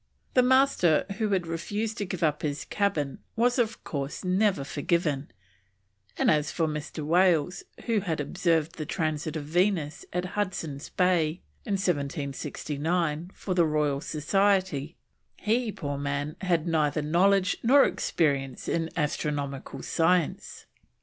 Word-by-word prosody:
The 255 - +6
Master 255 - +4
who 215 -2 +1
had 190 -3 +1
refused 210 +7 -3
to 205 - -1
give 175 -1 -3
up 150 -2 +1
his 145 -1 -3
cabin 165 -10 -1 0.2
was, 245 +2 +2
of 225 -2 0
course, 140 -1 -4
never 185 -4 +2
forgiven; 145 0 -1 0.9
and - - +4
as 150 -1 +2
for 165 - 0
Mr. 150 0 -4
Wales, 175 0 +3 0.2
who 230 -3 +2
had 170 -6 -2
observed 165 +2 0
the 155 - -3
Transit 155 -2 -2
of 150 -2 -4
Venus 170 -1 0
at 180 +1 -1
Hudson's 165 -8 -3
Bay 175 -3 +1 0.2
in 205 - -1
1769, 155 0 -1
for 190 - -3
the 170 -2 +3
Royal 150 -2 +1
Society, 175 -2 +1 0.4
he, 225 +1 0
poor 145 -6 -4
man, 145 +1 -2
had 175 -4 +1
neither 155 -2 +1
knowledge 185 +4 +3
nor 270 +4 +6
experience 140 -5 -1
in 165 -1 0
astronomical 145 -3 -2
science. 170 0 0
165 Hz, 135 wpm, -27 LUFS, 150-190 Hz, 0.9 s, The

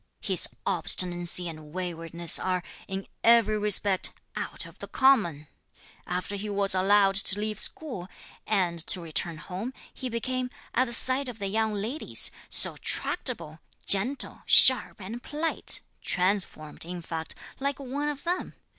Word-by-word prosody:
His - - +4 0.2
obstinacy 175 0 0
and 155 -2 -10
waywardness 170 -2 +1
are, 185 -1 -2 0.2
in 195 0 -5 0.2
every 225 -2 +4
respect, 205 -2 0 0.2
out - - -3
of - - -15
the - - -8
common. 210 - +2 0.6
After 180 +3 -4
he 210 +2 -6
was 200 -1 +3
allowed 195 +1 +3
to 200 0 +3
leave 215 0 -3
school, 245 - -1 0.4
and 180 -5 0
to - - +5
return 165 0 -4
home, 190 +11 -7 0.2
he 255 - -6
became, 250 +2 -3 0.2
at 255 - +2
the 235 - -8
sight 260 +3 +3
of 240 - -9
the 200 -2 -4
young 220 +1 -1
ladies, 225 +10 0 0.2
so - - +8
tractable, 165 - -3 0.3
gentle, 240 +8 +1
sharp, 260 -3 +7
and 215 +5 -8
polite, 305 +4 -1 0.2
transformed, 180 -5 -2
in 175 +1 -8
fact, 160 -1 -6 0.2
like 280 0 -2
one 280 +2 -4
of 290 -1 -6
them. 355 +2 -3
200 Hz, 145 wpm, -26 LUFS, 175-245 Hz, 0.6 s, so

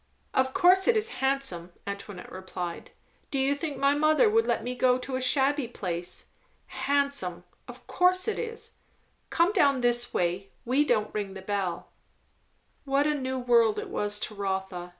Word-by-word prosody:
"Of 260 0 +2
course 370 +2 +5
it 475 -2 +5
is 435 +1 +1
handsome," 265 -11 -1
Antoinette 200 -1 -7
replied. 185 -2 -6 0.4
"Do 275 - -2
you 270 +1 +2
think 285 -1 -4
my 275 +1 +3
mother 310 +9 +3
would 455 +1 +3
let - - 0
me 250 - -3
go 250 0 +3
to 255 +1 -5
a 260 - -2
shabby 275 +1 +2
place. 180 -6 -4 0.6
Handsome! 280 -12 0 0.2
of - - -12
course 365 +2 +2
it 440 - -1
is. 460 -1 -6 0.6
Come 340 +5 +2
down 280 - +3
this 240 0 +2
way; 180 +3 -1 0.2
we 260 +5 +3
don't 215 -6 0
ring 200 -2 -4
the 190 - -7
bell." 195 -3 -3 0.9
What 275 +1 +1
a 300 - +2
new 260 -2 -3
world 235 -3 +3
it - - -5
was 205 0 -2
to 215 - -3
Rotha! 190 -3 -3
255 Hz, 170 wpm, -27 LUFS, 195-285 Hz, 0.9 s, course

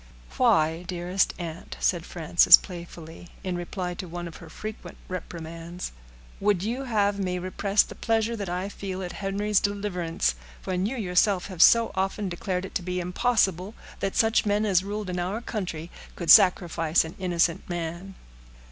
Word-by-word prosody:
"Why, 160 +1 +3
dearest 180 +2 0
aunt," 170 -2 -7
said 175 -2 0
Frances, 170 0 +6
playfully, 170 -2 -10
in 185 -2 -2
reply 180 +1 -4
to 180 +1 -7
one 175 +1 -6
of 165 - -10
her 165 - -12
frequent 215 +6 -8
reprimands, 170 -1 -6 0.5
"would 200 -3 +1
you 245 +6 -2
have 205 -4 +1
me 180 -2 -1
repress 195 +3 +1
the - - -10
pleasure 225 0 0
that 200 -4 -5
I 180 +2 -2
feel 190 -2 -5
at 175 - -5
Henry's 200 +1 0
deliverance, 180 - -1 0.3
when 185 +1 -1
you 260 +4 -4
yourself 190 -1 +1
have 180 -3 -3
so 230 +3 +6
often 195 +1 -1
declared 180 +1 -3
it - - -10
to - - -1
be 180 +1 -3
impossible 190 +1 0 0.2
that 195 - -2
such 225 0 +3
men 210 +1 +1
as 190 -3 +3
ruled 205 +1 -4
in 180 -1 -3
our 185 +5 -2
country 180 -8 -5 0.2
could 170 - +3
sacrifice 170 -3 +5
an 160 - -8
innocent 175 -2 0
man?" 175 +2 -5
185 Hz, 165 wpm, -26 LUFS, 175-205 Hz, 0.5 s, Frances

